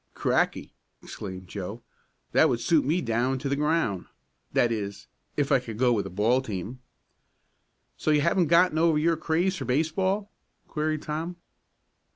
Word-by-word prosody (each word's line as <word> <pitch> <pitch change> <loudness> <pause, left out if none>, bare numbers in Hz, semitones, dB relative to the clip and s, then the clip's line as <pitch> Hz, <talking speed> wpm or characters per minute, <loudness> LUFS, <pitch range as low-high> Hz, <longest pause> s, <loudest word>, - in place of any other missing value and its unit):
"Cracky!" - - 0 0.3
exclaimed 95 -2 -8
Joe. 100 +5 -6 0.5
"That 160 - +5
would 120 -3 0
suit 155 +5 +3
me 165 +6 +1
down 120 +1 0
to 130 - -4
the 140 - +1
ground 150 - 0 0.4
that 120 - +2
is 100 -3 -4 0.3
if 145 0 +1
I 135 - +5
could 115 -3 -8
go 125 0 +3
with 100 -4 -1
a - - -7
ball 110 +7 +2
team." 110 +1 -5 1.2
"So - - -2
you 150 -1 +4
haven't 170 +2 +2
gotten 170 -1 +4
over 165 -2 +4
your 165 +2 +2
craze 170 +4 0
for - - -5
baseball?" 185 +9 0 0.4
queried 155 0 -2
Tom. 160 +4 -4
145 Hz, 160 wpm, -27 LUFS, 115-165 Hz, 1.2 s, That